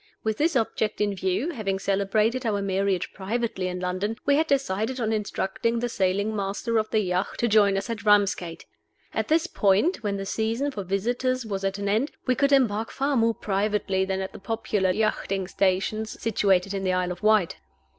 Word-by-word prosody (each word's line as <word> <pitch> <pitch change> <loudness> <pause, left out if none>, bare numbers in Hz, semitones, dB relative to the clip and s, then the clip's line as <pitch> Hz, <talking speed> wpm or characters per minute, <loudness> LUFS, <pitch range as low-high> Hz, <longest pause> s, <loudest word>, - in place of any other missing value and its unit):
With 220 -1 -1
this 320 +1 +1
object 220 -2 0
in 205 -1 +1
view, 190 - -1
having 205 - -2
celebrated 200 +5 +1
our 215 -4 0
marriage 195 -1 -1
privately 200 -1 -2
in 180 0 -4
London, 185 +5 -2
we 285 - +4
had 315 +2 +2
decided 260 -3 0
on 225 -2 0
instructing 210 +2 -1
the 240 +1 -1
sailing 200 +1 0
master 205 +3 -1
of 215 0 -2
the 220 - +2
yacht 180 -1 -1
to 235 - +1
join 205 -3 +4
us 195 - -3
at 230 -1 -4
Ramsgate. 200 -5 +2 0.5
At - - -1
this 325 +2 +3
port 210 - +2
(when 205 -2 -2
the 195 - -4
season 225 +7 -1
for 205 -7 -5
visitors 245 +6 -1
was 195 -3 -4
at 195 0 -1
an 200 0 -3
end) 220 +8 +1
we 255 - +3
could 280 +2 +1
embark 225 -5 +2
far 275 +1 -1
more 230 -2 +2
privately 200 -1 0
than 190 0 -2
at 190 - -5
the - - -9
popular 205 -2 -1
yachting 195 -1 0
stations 195 +4 -1
situated 195 -4 +1
in 195 -1 -3
the 185 -1 +1
Isle 180 0 0
of 180 - -7
Wight. 215 -4 +3
210 Hz, 195 wpm, -25 LUFS, 195-230 Hz, 0.5 s, we